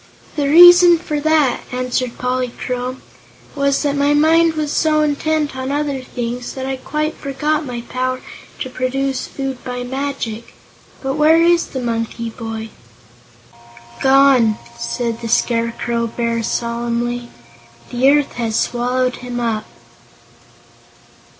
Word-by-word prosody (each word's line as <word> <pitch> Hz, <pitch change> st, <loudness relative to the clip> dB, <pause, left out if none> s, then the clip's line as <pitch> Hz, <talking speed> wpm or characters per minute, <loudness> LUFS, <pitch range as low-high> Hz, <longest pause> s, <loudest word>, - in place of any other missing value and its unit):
"The 285 Hz, -2 st, 0 dB
reason 350 Hz, +2 st, +9 dB
for 305 Hz, -3 st, -3 dB
that," 305 Hz, -4 st, +2 dB
answered 250 Hz, -1 st, -2 dB
Polychrome, 250 Hz, 0 st, -3 dB, 0.5 s
"was 280 Hz, 0 st, +1 dB
that 285 Hz, -1 st, 0 dB
my 285 Hz, +1 st, +2 dB
mind 325 Hz, +2 st, +4 dB
was 305 Hz, -2 st, -2 dB
so 310 Hz, -1 st, +2 dB
intent 300 Hz, 0 st, 0 dB
on 260 Hz, +1 st, -3 dB
other 285 Hz, -2 st, -1 dB
things 245 Hz, -1 st, -5 dB
that 265 Hz, -1 st, -4 dB
I 265 Hz, 0 st, -3 dB
quite 305 Hz, +4 st, -2 dB
forgot 295 Hz, +2 st, -2 dB
my 240 Hz, -1 st, -5 dB
power 255 Hz, +1 st, -3 dB, 0.4 s
to 260 Hz, -, -3 dB
produce 265 Hz, +1 st, -2 dB
food 270 Hz, -2 st, -5 dB
by 250 Hz, 0 st, -4 dB
magic. 255 Hz, -4 st, -4 dB, 0.5 s
But 270 Hz, +2 st, -2 dB
where 320 Hz, +2 st, +5 dB
is 345 Hz, 0 st, +3 dB
the 260 Hz, -, -5 dB
monkey 230 Hz, -1 st, -3 dB
boy?" 225 Hz, -1 st, -6 dB, 1.3 s
"Gone!" 265 Hz, -5 st, +5 dB, 0.2 s
said 225 Hz, -, -3 dB
the 230 Hz, -, -4 dB
Scarecrow 235 Hz, 0 st, 0 dB
Bear, 230 Hz, 0 st, -2 dB
solemnly. 235 Hz, +1 st, -2 dB, 0.6 s
"The 250 Hz, +2 st, +3 dB
earth 290 Hz, 0 st, +3 dB
has 225 Hz, -1 st, 0 dB
swallowed 250 Hz, +1 st, 0 dB
him 245 Hz, -1 st, -5 dB
up." 225 Hz, -3 st, -2 dB
255 Hz, 125 wpm, -18 LUFS, 240-290 Hz, 1.3 s, reason